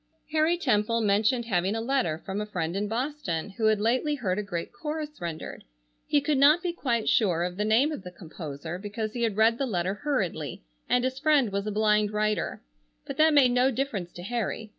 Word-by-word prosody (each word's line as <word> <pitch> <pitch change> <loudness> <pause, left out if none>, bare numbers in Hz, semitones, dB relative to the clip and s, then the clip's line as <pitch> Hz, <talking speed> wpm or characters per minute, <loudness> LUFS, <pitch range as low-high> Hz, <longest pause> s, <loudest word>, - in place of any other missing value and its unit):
Harry 315 +2 +2
Temple 230 -6 +1
mentioned 215 +4 +2
having 195 -1 0
a - - -1
letter 230 - -1
from 195 +2 -3
a - - -3
friend 175 -4 -3
in 205 +1 -1
Boston 230 - -3
who 220 +2 0
had 215 -1 +3
lately 255 +7 +1
heard 200 -8 -1
a - - 0
great 180 -3 -5
chorus 300 +4 -4
rendered. 170 -2 -6 0.4
He 290 - +3
could 285 -1 +1
not 300 +6 +6
be 350 -1 -1
quite 235 -9 -1
sure 175 -6 +3
of 180 0 -3
the 205 - -1
name 235 +8 +3
of 300 - -5
the 180 - -8
composer 165 -1 -7
because 215 +2 -4
he 240 - -4
had 225 -3 0
read 225 +1 +4
the 275 - 0
letter 185 -3 -1
hurriedly 190 - -3 0.3
and 250 0 +3
his 260 +1 -2
friend 290 -6 +3
was 200 +1 -2
a - - -1
blind 210 0 +2
writer, 215 0 -1 0.4
but - - -6
that 310 0 +5
made 260 -4 +6
no 250 +2 +3
difference 225 -9 -3
to 175 - -9
Harry. 225 0 -3
220 Hz, 210 wpm, -27 LUFS, 195-265 Hz, 0.4 s, not